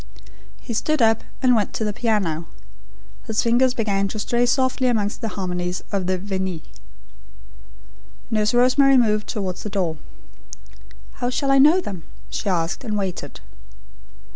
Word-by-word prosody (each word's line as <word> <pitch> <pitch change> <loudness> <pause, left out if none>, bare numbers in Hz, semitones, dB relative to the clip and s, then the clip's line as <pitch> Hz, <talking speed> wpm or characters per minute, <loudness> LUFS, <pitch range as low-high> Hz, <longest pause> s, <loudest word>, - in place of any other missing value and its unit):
He 235 - -6
stood 305 +7 0
up, 225 -2 +3 0.2
and 250 -1 +5
went 210 -3 0
to - - -2
the 210 -1 -1
piano. 200 -8 -1 0.8
His 220 -1 0
fingers 245 +2 +3
began 200 -4 0
to 205 - -6
stray 240 +3 +1
softly 260 0 +1
amongst 215 -3 0
the 225 - -2
harmonies 180 -1 -3
of 195 -3 -1
the 185 0 +1
Veni. 190 -3 -3 1.7
Nurse 215 -1 +2
Rosemary 260 +2 +5
moved 215 -3 +2
towards 190 -5 -3
the 210 - -5
door. 180 -6 -1 1.2
"How 245 - +1
shall 275 +2 0
I 275 - +5
know 305 +7 +6
them?" 190 - -6 0.3
she 205 - -2
asked, 170 +4 -1
and 215 -4 -2
waited. 190 -3 -4
215 Hz, 145 wpm, -22 LUFS, 190-245 Hz, 1.7 s, know